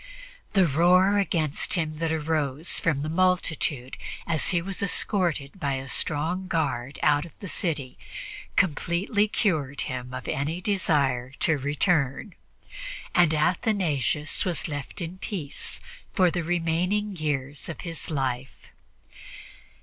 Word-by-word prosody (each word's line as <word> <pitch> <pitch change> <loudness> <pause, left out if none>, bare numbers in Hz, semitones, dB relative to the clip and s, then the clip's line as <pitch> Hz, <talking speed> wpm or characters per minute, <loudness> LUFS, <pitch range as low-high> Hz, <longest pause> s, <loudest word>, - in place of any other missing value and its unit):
The 195 -3 +5
roar 180 +6 +4
against 160 -6 0
him 155 -3 -2
that 165 -1 0
arose 155 -1 +1
from 150 -4 +1
the - - -2
multitude 160 -6 +1 0.3
as 160 -3 +2
he 175 - +2
was 190 +2 -3
escorted 180 -5 +1
by 140 -4 0
a 135 0 -4
strong 160 +7 -1
guard 140 -6 -1
out 145 -1 +4
of 170 - -12
the 200 - -7
city 155 - -2 0.6
completely 190 - +2
cured 155 - 0
him 125 -1 -4
of 130 0 -6
any 150 +5 -1
desire 140 - +1
to 160 - +4
return, 145 +4 0 0.8
and 175 -3 +5
Athanasius 155 - +1
was 175 -4 -1
left 145 +4 -5
in 175 +2 -5
peace 165 -10 -3 0.3
for 185 -4 +4
the 175 0 -1
remaining 175 +5 0
years 145 -3 -2
of 170 - -6
his 165 -2 -5
life. 130 -3 -3
160 Hz, 125 wpm, -26 LUFS, 145-180 Hz, 0.8 s, The